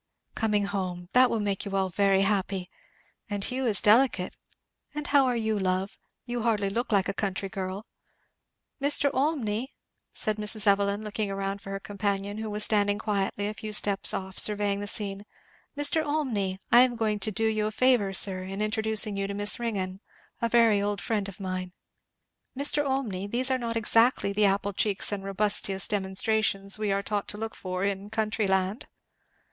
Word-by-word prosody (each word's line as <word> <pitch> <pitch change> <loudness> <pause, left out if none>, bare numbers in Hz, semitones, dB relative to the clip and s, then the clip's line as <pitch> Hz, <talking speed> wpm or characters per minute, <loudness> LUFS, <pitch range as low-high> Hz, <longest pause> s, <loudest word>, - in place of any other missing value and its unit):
"Coming 210 -3 0
home. 185 -3 -4
That 255 0 +5
will 230 - -1
make 200 -2 -2
you 200 -1 -5
all 190 -1 0
very 195 +1 +2
happy. 195 -2 -1 0.6
And 205 -1 -3
Hugh 255 +3 -1
is 210 -4 +4
delicate 220 -4 +3 0.6
and 300 0 -4
how 280 -2 +3
are 250 - 0
you, 220 -2 -1
love? 185 +1 -2 0.3
you 240 -1 -4
hardly 210 -4 0
look 235 +4 -3
like 195 -3 +2
a 195 - -2
country 195 -1 -3
girl. 190 +2 -5 1.0
Mr. 285 0 +3
Olmney! 260 -4 -1 0.2
" - - -53
said 215 -1 -2
Mrs. 210 0 -1
Evelyn 200 +1 +2
looking 210 -1 -3
round 195 0 -4
for 195 - -10
her 195 0 -4
companion, 200 0 -3
who 220 0 -4
was 210 0 +1
standing 205 -1 +2
quietly 205 -1 -2
a 210 - -4
few 215 0 -7
steps 200 -1 +5
off 190 0 -3
surveying 205 -1 +5
the 205 - -5
scene, 200 -1 -1 0.5
"Mr. 290 +2 +2
Olmney! 250 -11 -2
I 240 - +8
am 250 -1 +3
going 215 -2 -1
to 215 - 0
do 225 +3 0
you 215 -1 0
a - - -3
favour, 240 -4 +2
sir, 190 -1 +2
in 190 +2 -7
introducing 215 0 +1
you 195 0 -2
to 200 - -5
Miss 205 +2 +3
Ringgan 195 -5 -3 0.4
a 230 - 0
very 230 -3 +4
old 205 -1 -2
friend 205 +1 -2
of 195 - -12
mine. 185 -1 -5 0.8
Mr. 290 +1 +2
Olmney, 245 -9 -2
these 255 +4 +1
are 260 - +1
not 230 -1 -3
exactly 225 -2 +3
the 210 +1 +2
apple 200 +1 0
cheeks 205 +1 +1
and 200 -1 -4
robustious 195 -1 +1
demonstrations 195 0 0
we 210 -2 -1
are 200 0 -1
taught 205 0 -3
to 205 - -5
look 225 +1 -5
for 185 0 -5
in 200 0 -3
country 215 -1 -1
land?" 190 +4 -1
205 Hz, 185 wpm, -27 LUFS, 195-225 Hz, 1.0 s, I